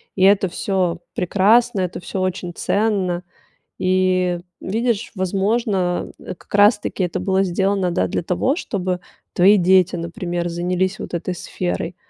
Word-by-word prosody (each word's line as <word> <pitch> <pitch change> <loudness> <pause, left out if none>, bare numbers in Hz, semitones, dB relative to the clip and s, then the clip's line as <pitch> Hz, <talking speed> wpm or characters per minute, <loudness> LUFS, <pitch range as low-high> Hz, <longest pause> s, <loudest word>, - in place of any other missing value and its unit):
И 185 - +1
это 195 0 +5
всё 180 -2 -1 0.2
прекрасно, 205 +4 +3
это 180 -1 -3
всё 185 +1 -4
очень 185 -1 -2
ценно. 195 -3 0 0.6
И, 185 -1 +1 0.2
видишь, 225 +2 -1
возможно, 195 -1 0 0.3
как - - -19
раз 205 +2 +6
таки 195 - -3
это 175 - -3
было 190 -1 +1
сделано, 190 0 0
да, 95 - +1
для - - -2
того, 185 - 0
чтобы 185 - -2 0.3
твои 195 +4 +6
дети, 185 0 +4
например, 175 +1 -3
занялись 180 +2 -1
вот - - -7
этой 175 +1 -2
сферой. 175 -1 -4
185 Hz, 140 wpm, -20 LUFS, 175-200 Hz, 0.6 s, раз